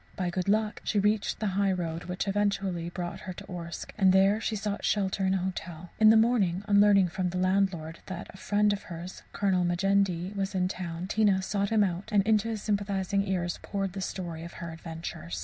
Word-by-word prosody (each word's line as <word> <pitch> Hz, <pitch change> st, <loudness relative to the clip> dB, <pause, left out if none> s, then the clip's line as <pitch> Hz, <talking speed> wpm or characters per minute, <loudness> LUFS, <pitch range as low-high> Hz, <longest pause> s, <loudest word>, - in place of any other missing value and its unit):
By 180 Hz, -2 st, -2 dB
good 185 Hz, +2 st, -2 dB
luck 215 Hz, +1 st, +1 dB
she 210 Hz, -, -1 dB
reached 210 Hz, +1 st, +1 dB
the 215 Hz, -2 st, 0 dB
high 200 Hz, 0 st, +2 dB
road, 170 Hz, -2 st, -3 dB
which 180 Hz, +2 st, -3 dB
eventually 195 Hz, -4 st, 0 dB
brought 175 Hz, 0 st, -5 dB
her 185 Hz, -, -6 dB
to -, -, -10 dB
Orsk; 170 Hz, -1 st, -7 dB
and 190 Hz, -2 st, +6 dB
there 195 Hz, +3 st, +4 dB
she 220 Hz, -, -1 dB
sought 205 Hz, 0 st, -3 dB
shelter 195 Hz, -1 st, +1 dB
in 190 Hz, -, +2 dB
a 185 Hz, -, -1 dB
hotel. 175 Hz, -2 st, -5 dB
In 215 Hz, 0 st, +8 dB
the 220 Hz, -, +7 dB
morning, 210 Hz, -6 st, +2 dB
on 200 Hz, -1 st, +5 dB
learning 200 Hz, -3 st, +5 dB
from 185 Hz, 0 st, -1 dB
the 180 Hz, -, -4 dB
landlord 185 Hz, -3 st, 0 dB
that 185 Hz, -2 st, -5 dB
a -, -, -12 dB
friend 205 Hz, +1 st, +2 dB
of 200 Hz, -, -4 dB
hers, 175 Hz, +2 st, -7 dB
a -, -, -10 dB
Colonel 190 Hz, -3 st, +2 dB
Majendie, 185 Hz, 0 st, +1 dB
was 195 Hz, 0 st, -2 dB
in 185 Hz, -, +2 dB
the 185 Hz, +2 st, 0 dB
town, 175 Hz, -1 st, -5 dB
Tina 200 Hz, -1 st, +2 dB
sought 200 Hz, 0 st, -1 dB
him 220 Hz, -2 st, +4 dB
out, 185 Hz, +1 st, -2 dB
and 205 Hz, -2 st, +4 dB
into 215 Hz, +1 st, +2 dB
his 220 Hz, -2 st, -3 dB
sympathizing 200 Hz, -1 st, 0 dB
ears 175 Hz, -2 st, -1 dB
poured 195 Hz, -2 st, -3 dB
the 195 Hz, -, -5 dB
story 170 Hz, -3 st, -5 dB
of 170 Hz, -, -9 dB
her 170 Hz, -1 st, -7 dB
adventures. 160 Hz, -, -6 dB
190 Hz, 220 wpm, -28 LUFS, 175-205 Hz, -, In